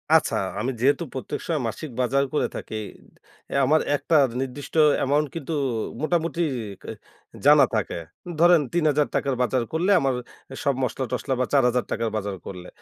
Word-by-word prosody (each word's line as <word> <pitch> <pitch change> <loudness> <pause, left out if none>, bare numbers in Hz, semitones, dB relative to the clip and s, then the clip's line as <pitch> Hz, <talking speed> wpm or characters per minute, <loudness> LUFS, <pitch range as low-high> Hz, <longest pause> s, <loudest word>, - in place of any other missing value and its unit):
আচ্ছা, - - +3 0.2
আমি 120 +5 -1
যেহেতু 140 +6 +3
প্রত্যেক 130 - -4
সময় 160 -4 -1
মাসিক 120 +7 -5
বাজার 135 +3 +2
করে 150 - +1
থাকি, - - -6 0.7
অ্যা - - -1
আমার 155 +4 +4
একটা 160 +3 0 0.3
নির্দিষ্ট 135 +2 -6 0.2
অ্যামাউন্ট 145 +3 +1
কিন্তু 165 0 -4 0.5
মোটামুটি 165 +1 0 1.0
জানা - - +8
থাকে। - - -1 0.4
ধরেন, 175 -1 +6
৩ 175 -1 +1
হাজার 150 0 +2
টাকার 135 -2 0
বাজার 125 0 +1
করলে 175 +5 +2
আমার 135 -1 +1 0.5
সব 140 - +2
মসলা 130 +2 -1
টসলা 135 - -1
বা 130 - +2
৪ 140 -2 +5
হাজার 125 0 0
টাকার 115 0 -1
বাজার 100 -2 -3
করলে, 90 -2 -8
140 Hz, 160 wpm, -24 LUFS, 125-155 Hz, 1.0 s, জানা